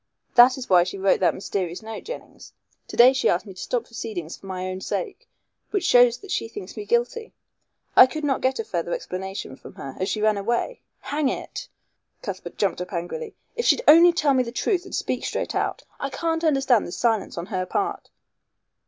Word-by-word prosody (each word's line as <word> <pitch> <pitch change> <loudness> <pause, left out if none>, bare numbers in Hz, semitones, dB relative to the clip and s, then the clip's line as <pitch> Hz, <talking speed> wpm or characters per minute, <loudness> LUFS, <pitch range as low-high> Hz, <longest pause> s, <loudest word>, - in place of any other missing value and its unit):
That 255 +1 +7
is 260 - -6
why 180 -2 +6
she 180 +2 -5
wrote 195 0 +2
that 185 - +2
mysterious 185 -1 -4
note, 220 0 -7
Jennings. - - -9 0.3
To - - -8
day 250 +2 +8
she 265 - +2
asked 175 - +1
me 195 - -10
to 185 - -13
stop 245 -2 -1
proceedings 200 -9 -6
for 195 - -14
my 185 -1 -4
own 185 0 -4
sake, 430 - -4 0.4
which 400 -3 -1
shows 245 -1 +5
that 400 -2 -11
she 230 - -1
thinks 205 -4 -9
me 210 -2 -6
guilty. 240 - -1 0.6
I 255 - +10
could 310 +3 -6
not 275 -3 0
get 260 0 +1
a 450 - -2
further 440 - -3
explanation 190 - -6
from - - -13
her, 135 - -8
as 185 - -1
she 215 - -1
ran 215 -1 +2
away. 235 - -2 0.2
Hang 290 -1 0
it!" - - -5 0.6
Cuthbert - - -6
jumped 195 -3 0
up 180 - -6
angrily, 300 - -5 0.2
"if 475 - -2
she'd 485 - +4
only 335 +3 +9
tell 305 -5 +2
me 260 - +3
the 235 -2 -4
truth 365 - 0
and 375 - -6
speak - - -2
straight - - -2
out. - - -2 0.2
I 275 - -2
can't 325 +4 -2
understand 270 -7 +3
this 175 - -6
silence 225 -6 0
on 170 - -3
her 185 -1 -1
part." 400 -1 -2
235 Hz, 210 wpm, -24 LUFS, 190-305 Hz, 0.6 s, I